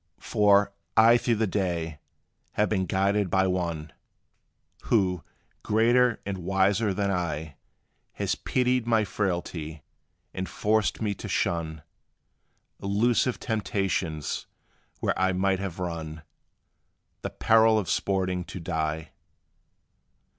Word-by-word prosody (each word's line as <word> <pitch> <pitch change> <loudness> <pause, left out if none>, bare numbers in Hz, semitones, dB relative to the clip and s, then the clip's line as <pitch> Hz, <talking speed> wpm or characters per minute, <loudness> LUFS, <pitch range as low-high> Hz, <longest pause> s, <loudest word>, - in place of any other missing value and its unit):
For, 100 -1 +3 0.2
I 115 +2 +8
through 120 -1 +1
the 110 +1 +1
day, 85 -6 -2 0.5
have 105 - +1
been 95 -4 0
guarded 100 +2 +1
by 95 +2 +3
One, 85 -4 -2 0.9
Who, 90 -6 +1 0.4
greater 120 +2 +3
and 95 -1 -3
wiser 95 +4 +2
than 100 +1 0
I, 80 -5 -3 0.6
Has - - -1
pitied 125 -2 0
my 115 -2 +3
frailty; 85 -6 -3 0.5
and 95 0 -4
forced 110 +1 0
me 105 -2 0
to - - -8
shun 80 -3 -1 1.0
Illusive 115 +5 +1
temptations, 95 -8 -2 0.5
where - - +1
I 95 0 +2
might 95 0 +1
have 95 -4 -4
run 80 -3 -5 1.0
The - - -3
peril 110 0 +4
of 100 -4 -1
sporting 95 0 0
to - - -7
die. 80 -2 -3
95 Hz, 110 wpm, -27 LUFS, 85-105 Hz, 1.0 s, I